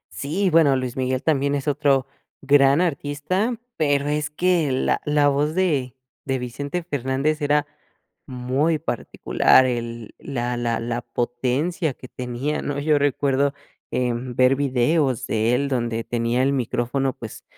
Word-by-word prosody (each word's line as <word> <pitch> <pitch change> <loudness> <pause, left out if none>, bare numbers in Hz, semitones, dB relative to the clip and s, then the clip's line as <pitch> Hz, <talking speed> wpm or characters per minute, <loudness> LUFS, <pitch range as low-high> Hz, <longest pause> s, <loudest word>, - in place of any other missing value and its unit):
Sí, 170 - -1
bueno 155 -4 +5
Luis 130 -2 -3
Miguel 130 0 -1
también 140 -2 +1
es 140 +1 -4
otro 140 -2 +2 0.4
gran 140 +2 +4
artista 175 - -1 0.2
pero 145 -2 +1
es 150 0 -1
que 170 -2 +1
la 130 - 0
la 150 -1 +3
voz 145 +3 +1
de 145 -9 0 0.3
de 135 -1 -1
Vicente 140 +7 -4
Fernández 145 0 -1
era 145 0 +2 0.6
muy 130 +6 0
particular 130 -1 +2
el 115 -2 -4
la 125 -3 -3
la 115 -1 -1
la 120 +1 -3
potencia 125 +7 -1
que 130 - -12
tenía, 125 +4 -3
¿no?, 145 -1 -3
yo 150 0 +2
recuerdo, 140 0 +1 0.4
em, 125 0 -2
ver 130 +1 +4
videos 135 0 +1
de 110 +2 +1
él 140 +2 0
donde 115 -3 -1
tenía 120 +2 0
el 140 - +2
micrófono, 130 +1 -1
pues, 115 - -9
135 Hz, 145 wpm, -23 LUFS, 125-150 Hz, 0.6 s, bueno